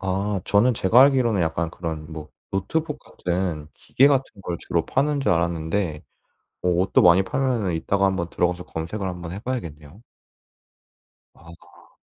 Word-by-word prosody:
아 95 +1 -1
저는 115 +5 +3
제가 110 +5 +4
알기로는 130 -7 +3
약간 80 0 -1
그런 80 -2 -6
뭐 75 -1 -8 0.2
노트북 150 - -2
같은 85 - -3
기계 135 +2 +3
같은 135 -2 +2 0.2
걸 85 - -3
주로 85 -1 -1
파는 145 +1 0
줄 135 - +2
알았는데 85 0 -1 0.6
뭐 90 - +2
옷도 95 - +3
많이 90 +2 +6
팔면은 115 -4 -1
이따가 100 +4 +1
한번 95 -3 -1
들어가서 90 0 -1
검색을 85 +5 -5
한번 90 -2 -6
해 95 - -6
봐야겠네요. 85 - -6 1.3
아. 85 +1 -18
95 Hz, 305 characters per minute, -23 LUFS, 85-110 Hz, 1.3 s, 많이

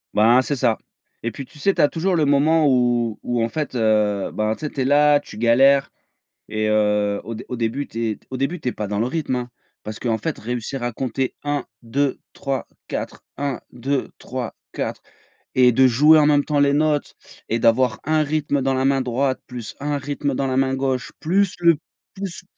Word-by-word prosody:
Ben, 115 +4 +6
c'est 145 +2 -2
ça. 120 -4 +1 0.4
Et 115 - -2
puis 135 +4 -7
tu 150 - -18
sais, 195 +6 +2
tu - - +2
as 145 - +6
toujours 180 +3 0
le 155 -3 +2
moment 150 +3 +3
où 120 -4 +2
où, 120 -1 -1
en 115 - 0
fait 150 +1 -4
heu, 105 -3 +1
bah, 110 0 0
tu 155 - -7
sais - - -2
tu 135 - -3
es - - +1
là, 145 +1 +5
tu 105 - -12
galères 135 +4 +4 0.6
et 110 0 -1
heu, 105 -1 +2
au 115 - -5
dé - - -8
au 125 - -4
début, 115 +5 -2
tu 115 0 -2
es - - -9
au 130 - -3
début, 140 +7 -2
tu 130 - -2
es - - -1
pas 105 - -4
dans 100 +1 -2
le 115 - +1
rythme, 145 -1 -2
hein. 125 0 -4 0.3
Parce 110 0 -7
qu'en 115 -2 -1
fait, 160 +3 -3
réussir 120 +2 -4
à 120 - -1
compter 130 +2 -2
1, 145 -2 -1 0.2
2, 135 +4 -1
3, 135 -1 -3 0.2
4, - - -5
1, 140 -2 -2
2, 135 +2 -2
3, 125 -2 -5 0.2
4, - - -4 0.5
et 125 -1 +6
de 130 +2 +5
jouer 150 +6 +6
en 150 - +5
même 145 -1 +4
temps 150 -1 0
les 140 0 +4
notes 150 0 +1 0.3
et 115 +1 0
d'avoir 115 0 +3
un 155 0 +2
rythme 145 -1 0
dans 135 0 +1
la 130 0 0
main 135 -1 +2
droite, 130 +2 0
plus 120 -4 -8
un 145 0 -2
rythme 140 0 -2
dans 135 0 -1
la 130 - -1
main 135 0 +2
gauche, 130 -1 -2
plus 190 +4 +1
le 170 -2 +5 0.4
plus 190 -3 -6
130 Hz, 220 wpm, -22 LUFS, 115-145 Hz, 0.6 s, Ben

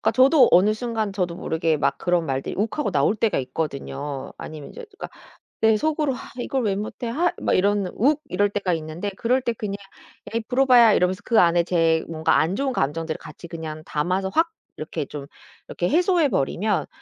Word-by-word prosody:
그러니까 - - +2
저도 270 +3 +6
어느 195 +5 +5
순간 220 -3 -3
저도 180 -3 -2
모르게 160 -2 0
막 145 - 0
그런 175 -2 0
말들이 135 -1 -3
욱하고 225 +5 -1
나올 150 +4 +2
때가 220 -1 0
있거든요. 140 0 -4
아니면 155 -2 -9
이제 485 - -9
누가 400 - -8 0.5
내 220 -1 +4
속으로 300 +2 0
'하 250 - -8
이걸 260 +1 -1
왜 200 -2 0
못해? 215 +4 -5
하.' 330 +10 +1
막 - - +1
이런 200 0 +2
욱 290 +6 +2
이럴 205 +3 +1
때가 195 -4 -1
있는데 160 +5 -4
그럴 250 +5 +1
때 245 -2 -1
그냥 205 -2 -4 0.6
"에이 230 0 -1
브로바야." 250 -3 +6
이러면서 185 0 +1
그 230 - +4
안에 170 0 +4
제 165 -2 +2
뭔가 160 -1 +1
안 165 +4 +1
좋은 270 +5 -1
감정들을 160 - -2
같이 165 +3 -11
그냥 160 -2 -7
담아서 180 +6 -1
확 330 +1 +2 0.3
이렇게 155 -1 -4
좀 140 -1 -8 0.4
이렇게 175 - -2
해소해 345 0 +3
버리면 200 - 0
195 Hz, 390 characters per minute, -23 LUFS, 160-240 Hz, 0.6 s, 저도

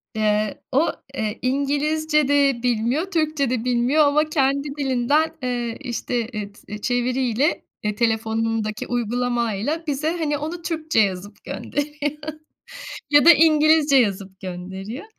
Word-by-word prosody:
Iıı, 215 -1 +1 0.2
o, 270 - +3 0.4
ııı, 215 -1 -1
İngilizce 295 +3 +1
de 280 -4 +2
bilmiyor, 245 - +1
Türkçe 310 -5 0
de 245 -3 -1
bilmiyor 250 +5 +3
ama 300 +2 +3
kendi 280 -1 +1
dilinden, 285 +3 +1
ııı, 240 -2 -2
işte, 240 -1 -3
ııı, 205 -1 -4 0.2
t 210 - -6
çeviriyle, 250 +3 0 0.2
ııı, 210 - 0
telefonundaki 225 -1 -1
uygulamayla 240 +3 -1
bize, 290 +1 -1
hani, 295 -3 -1
onu 325 +4 -5
Türkçe 315 -6 -1
yazıp 200 0 -1
gönderiyor. 295 0 -3 0.9
Ya 290 0 +5
da 340 - +11
İngilizce 310 -2 +5
yazıp 195 -5 0
gönderiyor 190 - -7
255 Hz, 120 wpm, -22 LUFS, 225-295 Hz, 0.9 s, da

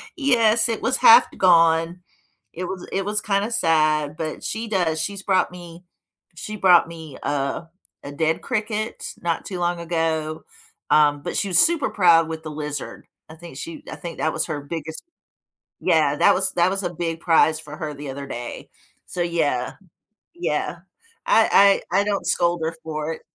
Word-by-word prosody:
Yes. 235 -6 +3
It 225 - -2
was 260 0 +1
half 235 +2 +8
gone. 165 -1 +3 0.5
It 180 +2 -5
was 185 0 -6
it 195 - -1
was 210 +1 +1
kinda 200 +2 0
sad, 155 -6 +1
but 155 -1 -5
she 225 +1 -3
does. 175 -6 0
She's 200 +2 -4
brought 190 -2 +2
me 175 -1 -12 0.5
she 210 +5 -6
brought 180 -4 +5
me 160 -4 -10
a 140 +3 -2 0.4
a 140 - -7
dead 160 +2 -1
cricket 215 -2 -3
not 170 -1 -1
too 185 - -5
long 175 0 -1
ago, 160 -2 -2 0.5
um, 145 -1 +4
but - - -4
she 200 - 0
was 180 -3 +2
super 335 -2 +3
proud 170 -4 +4
with 160 0 -6
the 155 - -6
lizard. 150 -1 -6 0.2
I - - -10
think 170 +1 -12
she 320 -3 -8
I - - -6
think 170 -2 -8
that 155 - 0
was - - -1
her 150 -3 -4
biggest 160 +2 -7 0.8
yeah, 155 -4 +2
that 200 - +5
was 190 0 +1
that 175 0 +3
was 195 +1 -2
a 175 - -2
big 165 -1 -3
prize 160 -2 +3
for 155 -1 -10
her 155 -2 -5
the 145 -1 -7
other 140 +1 -7
day. 120 -3 -7 0.4
So 180 - -3
yeah. 155 -7 -1 0.6
Yeah. 345 +1 -3 0.5
I 200 -3 +5
I 185 - +3
I - - +2
don't 205 -1 -2
scold 175 -1 +1
her 160 +1 -2
for 155 0 -4
it. - - -11
170 Hz, 180 wpm, -22 LUFS, 155-195 Hz, 0.8 s, half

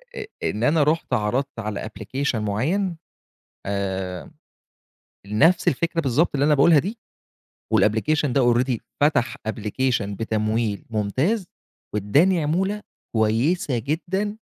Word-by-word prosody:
أ 435 - -5 0.2
إن 110 +3 -1
أنا 150 +2 +4
رُحت 150 -3 0
عرضت 125 +4 -1
على 105 -1 -4
أبلكيشن 115 +3 -3
معيّن، 165 - -1 0.7
آمم، 95 -2 -3 1.0
نَفس 160 - +3
الفكرة 165 +4 0
بالضبط 145 +3 +2
اللي 140 - +2
أنا 150 - +5
باقولها 145 +2 +6
دي، 210 +9 -2 0.8
والأبلكيشن 135 +6 +2
ده 120 -3 +4
already 125 0 +1 0.2
فتح 145 -5 +2
أبلكيشن 110 -1 -1
بتمويل 110 -1 -1
ممتاز، 130 - 0 0.5
واداني 150 - +3
عمولة 190 +7 0 0.3
كويّسة 120 +6 +1
جدًا، 190 - -2
130 Hz, 110 wpm, -23 LUFS, 110-165 Hz, 1.0 s, باقولها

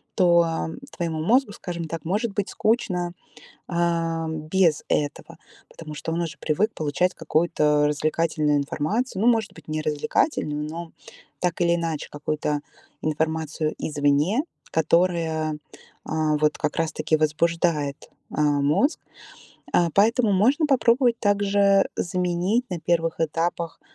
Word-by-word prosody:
то, 175 -3 +5
м, 165 0 -3
твоему 165 -3 -3
мозгу, 240 +5 +3
скажем 170 -4 -5
так, 165 -1 -6
может 205 +5 -1
быть 200 -1 -2
скучно, 185 -6 0 0.6
эм, 165 -2 -1
без 170 -3 +2
этого, 145 -1 -2 0.3
потому 155 -2 -10
что 160 - -4
он 170 +1 -1
уже 165 -1 -4
привык 205 +9 0
получать 155 +4 0
какую-то 150 -2 +2
развлекательную 155 0 +1
информацию. 185 - -1
Ну, - - +4
может 225 -3 -1
быть, - - -15
не 155 0 -2
развлекательную, 150 - 0
но 165 +1 -7 0.5
так 180 -1 -1
или 170 0 +3
иначе 165 -3 -3
какую-то 150 0 -2 0.4
информацию 155 0 -1
извне, 145 - +1 0.3
которая, 160 -1 +1
э, - - -6 0.8
вот 150 0 +2
как 150 -1 -2
раз 165 -1 0
таки 155 - 0
возбуждает, 155 -1 0 0.3
э, - - +1
мозг. 145 - +2 0.7
Э, 175 - +4
поэтому 220 +2 +3
можно 250 - +3
попробовать 240 -2 +3
также 200 -1 +3
заменить 180 +7 0
на 180 -2 -3
первых 165 0 0
этапах 165 +1 -2
165 Hz, 130 wpm, -24 LUFS, 155-190 Hz, 0.8 s, то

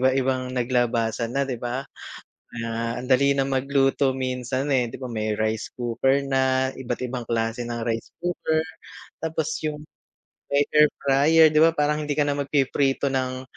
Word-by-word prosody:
iba-ibang 130 -1 +1
naglabasan 120 -1 0
na 140 - +2
di 130 -4 -5
ba 125 +3 -3 0.8
na 115 +1 -3
ang 125 - -7
dali 140 +2 +4
na 135 -1 +1
magluto 135 0 +2
minsan 130 +1 -2
eh 120 -3 0
di - - -8
ba 130 - -5
may 110 -2 -2
rice 110 0 -1
cooker 125 +3 +1
na 130 -1 +2
iba't 120 -2 -4
ibang 125 -1 -4
klase 115 +1 -2
ng 120 0 -4
rice 115 -1 -3
cooker 170 -2 -1 0.6
tapos 160 -1 -2
yung, 150 -1 -4 0.7
air 150 +1 +5 0.2
fryer 155 +4 +5
d 155 - +2
iba 165 +1 +5
parang 150 0 0
hindi 145 - -1
ka 150 - +2
na 145 -1 0
magpiprito 140 -1 +1
ng 130 -1 -2
130 Hz, 160 wpm, -24 LUFS, 120-140 Hz, 0.8 s, air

